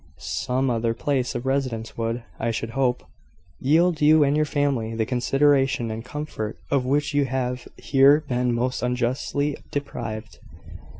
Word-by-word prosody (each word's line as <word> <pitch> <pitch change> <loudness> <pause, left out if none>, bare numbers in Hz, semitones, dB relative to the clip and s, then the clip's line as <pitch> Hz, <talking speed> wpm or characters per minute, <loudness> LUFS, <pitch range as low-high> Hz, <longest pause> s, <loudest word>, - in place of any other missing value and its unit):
"Some 125 - -1
other 115 0 0
place 130 -1 -1
of 120 +1 -4
residence 130 -4 -2
would, 115 +1 -2 0.2
I 115 - 0
should 115 0 -3
hope, 125 -1 0 0.6
yield 160 +4 +3
you 155 +1 +6
and 140 0 +2
your 155 0 +2
family 135 -7 0
the 110 -1 0
consideration 135 0 +2
and 110 +1 -5
comfort 125 -6 -5
of 135 -3 +2
which 145 +2 +1
you 145 -1 +3
have 125 -1 -3
here 140 +2 +5
been 125 -1 0
most 120 +1 -1
unjustly 125 +4 -1
deprived. 110 -6 -5
130 Hz, 145 wpm, -24 LUFS, 115-145 Hz, 0.6 s, you